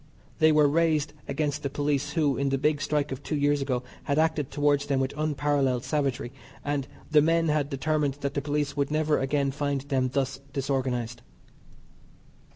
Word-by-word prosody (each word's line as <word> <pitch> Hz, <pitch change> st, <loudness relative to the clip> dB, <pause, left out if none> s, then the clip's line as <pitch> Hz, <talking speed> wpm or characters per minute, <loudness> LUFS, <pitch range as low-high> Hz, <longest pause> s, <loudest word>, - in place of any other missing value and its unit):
They 155 Hz, 0 st, +6 dB
were 150 Hz, -1 st, +5 dB
raised 155 Hz, -1 st, +2 dB
against 145 Hz, +1 st, -1 dB
the 140 Hz, -, -2 dB
police 145 Hz, 0 st, -1 dB
who, 150 Hz, -5 st, +2 dB
in 140 Hz, 0 st, 0 dB
the 135 Hz, -, +1 dB
big 145 Hz, +1 st, +1 dB
strike 145 Hz, 0 st, 0 dB
of 135 Hz, +1 st, -5 dB
two 155 Hz, -, -3 dB
years 145 Hz, 0 st, +2 dB
ago, 130 Hz, -2 st, -1 dB, 0.2 s
had 140 Hz, -, 0 dB
acted 160 Hz, -3 st, +1 dB
towards 145 Hz, -1 st, +1 dB
them 140 Hz, -2 st, +1 dB
with 135 Hz, 0 st, -1 dB
unparallelled 145 Hz, -4 st, 0 dB
savagery, 140 Hz, -5 st, -1 dB, 0.3 s
and 145 Hz, -2 st, -1 dB, 0.2 s
the 150 Hz, -1 st, +6 dB
men 165 Hz, +1 st, +2 dB
had 150 Hz, -2 st, +1 dB
determined 145 Hz, 0 st, 0 dB
that 140 Hz, 0 st, -2 dB
the 140 Hz, -, -1 dB
police 145 Hz, 0 st, -1 dB
would 140 Hz, -1 st, 0 dB
never 155 Hz, 0 st, +1 dB
again 140 Hz, +1 st, 0 dB
find 140 Hz, -1 st, -1 dB
them 135 Hz, -2 st, 0 dB
thus 135 Hz, 0 st, -1 dB
disorganised. 125 Hz, -4 st, -2 dB
145 Hz, 175 wpm, -27 LUFS, 135-150 Hz, 0.3 s, They